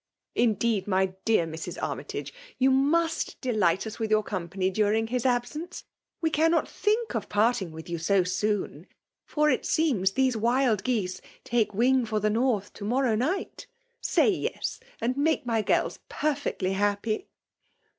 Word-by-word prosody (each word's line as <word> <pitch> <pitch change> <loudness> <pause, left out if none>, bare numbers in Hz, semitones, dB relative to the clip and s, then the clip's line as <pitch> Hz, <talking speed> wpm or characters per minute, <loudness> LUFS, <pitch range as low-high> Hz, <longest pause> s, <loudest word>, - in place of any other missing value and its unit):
Indeed, 220 -3 +1
my 190 -1 +1
dear 220 -7 +3
Mnk 160 0 -6
Armytage, - - -4 0.3
yoa 265 +1 +4
mnut 325 +5 +1
deligjit 205 -8 +1
na 220 - -4
with 220 -1 -1
yoor 215 0 +3
com 180 -4 -4
pany 190 +1 -1
daring 215 +2 +2
his 245 +2 -2
abseaoe. 260 +8 -1 0.4
We 320 -1 +1
eannot 325 +2 +2
think 440 +2 0
of - - -3
parting 210 -4 +1
with 160 0 -9
yoa 170 -1 -4
so 190 +2 +3
soon; 205 +3 -2 0.4
for 300 0 +2
it - - 0
seems 225 - +1
these 260 0 +2
wild 235 -2 +2
geese 215 -7 -1 0.2
take 225 -4 0
wing 250 +2 +3
for 215 -1 0
the 210 +1 +1
North 225 -3 0
to*mocnnr 235 +3 0
night. 310 - -2 0.3
Say - - +3
yes, 375 - -3 0.2
and 240 +3 0
make 305 -1 +1
mj 225 -3 0
girls - - +1
perfiectly 285 -10 -1
happy 205 - -1
225 Hz, 155 wpm, -27 LUFS, 200-265 Hz, 0.4 s, yoa